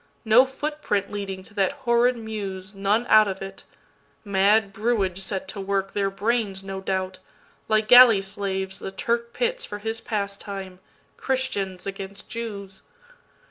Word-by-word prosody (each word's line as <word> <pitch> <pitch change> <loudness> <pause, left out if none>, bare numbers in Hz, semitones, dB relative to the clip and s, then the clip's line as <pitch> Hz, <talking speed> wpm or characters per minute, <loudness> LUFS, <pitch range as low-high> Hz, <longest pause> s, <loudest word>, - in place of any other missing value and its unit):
No 235 +4 +6
foot 295 +3 -5
print 200 -7 -1
leading 195 -2 -5
to 205 - -18
that 200 +4 +1
horrid 245 -2 +2
mews, 205 -3 -6
None 200 +4 +1
out 215 -3 +6
of 190 -1 -4
it. 195 0 -9 0.6
Mad 200 +1 +3
brewage 205 -4 0
set 190 0 -2
to 200 - -4
workTheir 195 0 -1
brains, 200 -1 -1
no 195 0 -6
doubt, 190 -1 -2 0.5
like 215 0 +2
galley 245 -5 +8
slaves 190 -1 -3
the - - -6
TurkPits 235 - -1
for 205 - -6
his 225 +2 -4
pastime, 200 -3 -5 0.4
Christians 205 -9 -2
against 195 0 -7
Jews. 200 -5 -6
200 Hz, 140 wpm, -24 LUFS, 195-230 Hz, 0.6 s, galley